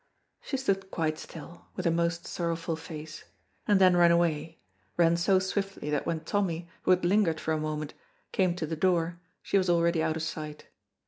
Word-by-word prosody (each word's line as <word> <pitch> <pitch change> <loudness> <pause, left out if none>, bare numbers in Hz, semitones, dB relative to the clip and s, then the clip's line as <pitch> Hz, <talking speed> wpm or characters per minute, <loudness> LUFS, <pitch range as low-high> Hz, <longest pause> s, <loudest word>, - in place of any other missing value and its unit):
She 270 - -3
stood 195 -7 -1
quite 155 -3 -1
still, 165 +2 -10
with 185 - -4
a 170 - +4
most 170 0 0
sorrowful 165 -1 -2
face, 155 -1 -9 0.4
and 205 -2 +4
then 185 -2 +6
ran 175 -1 +6
away, 165 -2 +1 0.4
ran 170 -1 +5
so 175 +3 +3
swiftly 190 -4 -2
that 150 - -1
when 160 -1 -1
Tommy, 170 -1 -1
who - - -3
had 185 -1 +4
lingered 180 -4 +3
for 160 - -2
a 155 - +1
moment, 155 -1 -3 0.4
came 185 -3 +2
to 175 -3 -3
the 160 +1 -3
door 170 0 +1 0.2
she 200 - +2
was 185 -1 0
already 170 -1 +3
out 160 0 0
of 160 - -3
sight. 155 -1 -5
170 Hz, 190 wpm, -29 LUFS, 160-185 Hz, 0.4 s, then